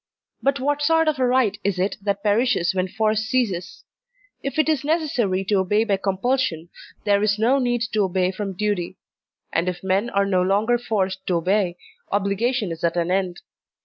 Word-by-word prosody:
But 275 0 +1
what 290 +2 0
sort 325 +2 +3
of 305 -3 +1
a 255 - +3
right 245 -5 +2
is 200 -2 0
it 190 +3 0
that 200 0 -2
perishes 210 -4 +2
when 185 0 0
force 215 +2 0
ceases? 220 -6 -2 0.6
If 275 +3 -4
it 310 - +3
is 310 -4 +1
necessary 280 - 0
to 200 0 +2
obey 205 +4 +2
by 205 -3 +1
compulsion, 195 -3 -1 0.3
there 205 -1 +3
is 210 0 +2
no 245 +6 +3
need 245 -2 0
to 215 - +2
obey 185 0 0
from 195 0 -4
duty; 190 -4 -2 0.6
and 170 +2 +1
if 180 0 -6
men 195 +5 +1
are 200 -3 +1
no 185 -2 +2
longer 210 +6 +2
forced 190 -5 -2
to 180 - +1
obey, 180 +1 +1 0.3
obligation 205 +2 0
is 165 - -7
at 170 +1 +1
an 170 +1 0
end. 185 -2 -1
205 Hz, 185 wpm, -23 LUFS, 185-245 Hz, 0.6 s, sort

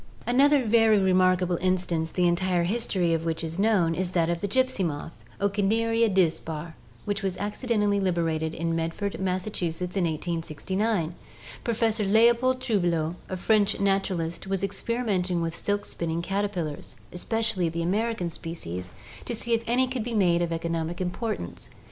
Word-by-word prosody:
Another 275 +2 +4
very 225 -1 +5
remarkable 185 -2 +3
instance 180 -3 0
the 180 -1 +2
entire 175 0 +1
history 185 -3 +1
of 165 0 0
which 165 0 -2
is 165 +2 -4
known 195 -6 +3
is 180 +1 -2
that 170 -1 +2
of 170 - -2
the 205 - -1
gypsy 260 -1 +2
moth 160 0 -5 0.2
(Ocneria 225 +3 +2
dispar) 165 -3 0 0.3
which 205 0 -1
was 190 -2 -2
acci 210 +5 -5
dentally 205 -3 +2
liberated 165 -3 0
in 165 0 -1
Medford, 165 +5 -2
Massachusetts, 180 -2 -2
in 190 -3 +2
1869. 170 +3 -1 0.5
Professor 225 -2 +1
Leopold 235 +5 +4
Trouvelot, 175 -8 +1 0.2
a 185 - -3
French 205 +1 +2
naturalist, 195 -4 0
was 195 0 -1
experimenting 195 -4 -1
with 165 0 -2
silk 205 +2 -1
spinning 170 0 -3
caterpillars, 185 -9 -3 0.2
especially 200 -1 0
the 170 +1 -3
American 200 -1 0
species, 90 - -6 0.4
to 240 - -3
see 235 +1 -1
if 230 0 +1
any 250 +2 +3
could 255 -3 -3
be 235 0 -3
made 175 -4 +3
of 170 -1 -1
economic 165 0 -2
importance. 180 - -4
185 Hz, 150 wpm, -26 LUFS, 170-215 Hz, 0.5 s, very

